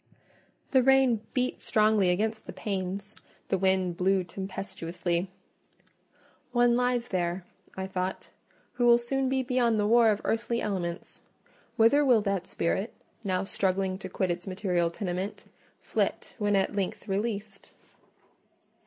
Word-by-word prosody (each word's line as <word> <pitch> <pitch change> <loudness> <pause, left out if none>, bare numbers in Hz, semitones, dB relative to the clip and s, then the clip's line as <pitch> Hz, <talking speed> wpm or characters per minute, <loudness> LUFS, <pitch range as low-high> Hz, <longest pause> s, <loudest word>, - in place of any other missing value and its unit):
The 260 - +5
rain 265 -3 +4
beat 255 0 0
strongly 215 -3 +3
against 220 +4 -1
the - - -6
panes, 195 0 -4 0.3
the 190 - +2
wind 190 -2 +1
blew 190 0 +2
tempestuously: 180 -1 -3 1.2
"One 240 -1 +4
lies 245 -1 +1
there," 175 -1 -1 0.3
I 190 - -2
thought, 190 -1 -4 0.4
"who 245 -1 +2
will 235 0 +8
soon 265 +2 -1
be 265 0 +1
beyond 245 -3 +2
the 205 - +2
war 230 +1 +5
of 210 -1 +1
earthly 235 +1 0
elements. 180 -5 -4 0.6
Whither 230 +6 +5
will 245 -6 +5
that 195 -3 -1
spirit—now 190 +1 -3
struggling 190 -1 0
to 190 - -7
quit 185 0 -1
its 175 +1 -5
material 185 -3 0
tenement—flit 185 +2 -4
when 205 -1 +2
at 195 +1 +1
length 195 +1 -3
released?" 205 0 -3
200 Hz, 125 wpm, -28 LUFS, 185-235 Hz, 1.2 s, will